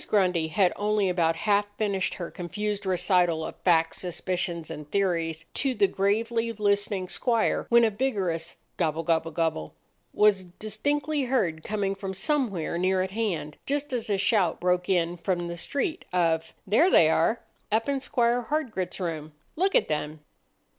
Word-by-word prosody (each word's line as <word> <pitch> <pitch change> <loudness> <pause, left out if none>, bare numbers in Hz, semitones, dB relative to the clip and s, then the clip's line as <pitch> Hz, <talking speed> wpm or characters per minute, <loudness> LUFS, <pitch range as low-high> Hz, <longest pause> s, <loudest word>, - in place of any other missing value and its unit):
Grundy 180 -6 +2
had 180 +3 +2
only 210 -1 +1
about 165 -2 +2
half 205 +4 +1
finished 200 -3 -1
her 170 -2 -6
confused 205 +3 -4
recital 180 -3 +2
of - - -6
facts, 165 -2 +2
suspicions, 175 -2 -3
and 150 -1 -8
theories 170 -4 0
to 270 -2 0
the 400 - +4
gravely 230 - 0
listening 205 -3 0
squire, 230 +4 0
when 235 0 +6
a 225 - +3
vigorous 200 -8 -2 0.2
"Gobble 165 -1 0
gobble 165 0 +1
gobble!" 160 - -2 0.4
was 205 -3 +3
distinctly 275 - -2
heard 175 -12 0
coming 200 -2 -1
from 195 -1 -6
somewhere 200 - 0
near 185 +1 +2
at 190 - -5
hand, 190 -8 -2
just 290 0 -1
as 235 -2 -2
a 200 - +2
shout 190 -4 +2
broke 180 0 +1
in 175 -2 +1
from 175 0 -1
the 170 - -5
street 285 - -2
of,— 165 -2 0
"There 225 - +4
they 165 - +6
are—up 220 - 0
in 280 -1 0
Squire 240 -2 +1
Hardgrit's 225 - -2
room! 160 -4 -4 0.2
Look 380 +4 +1
at - - +4
them!" 150 0 -3
190 Hz, 155 wpm, -27 LUFS, 170-220 Hz, 0.4 s, when